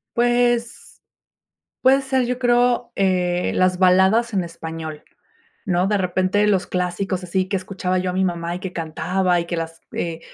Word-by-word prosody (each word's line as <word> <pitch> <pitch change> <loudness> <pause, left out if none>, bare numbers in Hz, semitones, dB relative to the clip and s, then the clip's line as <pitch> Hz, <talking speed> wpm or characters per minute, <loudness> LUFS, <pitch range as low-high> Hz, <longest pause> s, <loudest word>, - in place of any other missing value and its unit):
Pues, 240 0 0 0.8
puede 270 +1 +4
ser, 265 -2 0
yo 250 0 -2
creo, 245 -1 +2
eh, 180 -2 +1
las 185 0 +2
baladas 190 +5 +4
en 185 - +1
español, 160 -2 -7 0.6
¿no?, 180 0 +1
de 205 0 +1
repente 185 +2 +1
los 195 -3 +1
clásicos 180 +1 -2
así, 185 +1 -1
que 195 - 0
escuchaba 185 0 -2
yo 180 0 -1
a - - -4
mi 190 0 +1
mamá, 170 -1 -2
y - - -5
que 190 -2 -6
cantaba, 180 +2 0
y 170 - -1
que 170 - -3
las 165 0 -5
eh, 165 -1 -3
185 Hz, 170 wpm, -21 LUFS, 175-225 Hz, 0.8 s, puede